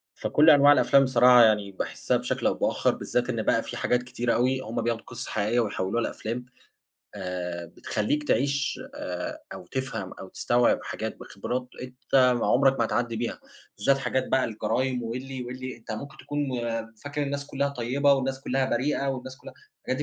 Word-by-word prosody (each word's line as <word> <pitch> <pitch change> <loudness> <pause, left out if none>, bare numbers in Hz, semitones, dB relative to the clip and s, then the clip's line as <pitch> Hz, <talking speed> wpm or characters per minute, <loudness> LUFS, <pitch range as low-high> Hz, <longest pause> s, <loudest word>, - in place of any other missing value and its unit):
فكل 155 +2 +4
أنواع 145 -1 +8
الأفلام 140 -1 +5
بصراحة، 125 -1 +6
يعني 105 -3 +3
باحسّها 95 - -1
بشكل - - -1
أو - - +2
بآخر، - - +1
بالذات 125 +1 -1
إن 115 -3 -1
بقى 115 - +2
في - - -6
حاجات 125 0 +1
كتيرة 120 -1 -1
أوي، 130 +2 +2
هُم 115 -1 -3
بياخدوا 115 -1 -1
قصص 120 +1 -7
حقيقية 110 +3 0
ويحوِّلوها 105 0 -1
لأفلام، 120 +3 -4 0.7
آآ، 90 -3 -4
بتخلّيك 110 - -2
تعيش، 140 +1 +1 0.2
آآ، 90 -1 -5
أو 90 - -9
تفهم 115 -7 -4
أو 95 - -10
تستوعب 120 +5 +2
حاجات - - -5
بخبرات 125 +1 -4
أنت 125 0 -9 0.2
ما 125 -2 +5
عُمرك 135 +4 +4
ما 115 - +3
هتعدّي 115 0 -1
بيها. 115 +1 -3 0.4
بالذات 135 +7 +3
حاجات 130 -1 -1
بقى، 130 -1 +2
الجرايم 120 +3 -1
واللي 130 +3 -5
واللي، 130 0 -6
أنت 115 - -9
ممكن 140 +6 -7
تكون 145 - -5 0.6
فاكر 145 +1 -2
الناس 140 0 -3
كلّها 140 0 -1
طيِّبة 140 +2 +2
والناس 135 0 -1
كلّها 135 0 0
بريئة 140 +3 0
والناس 130 -1 -4
كلّها، - - -12 0.3
الحاجات - - 0
125 Hz, 170 wpm, -26 LUFS, 115-135 Hz, 0.7 s, أنواع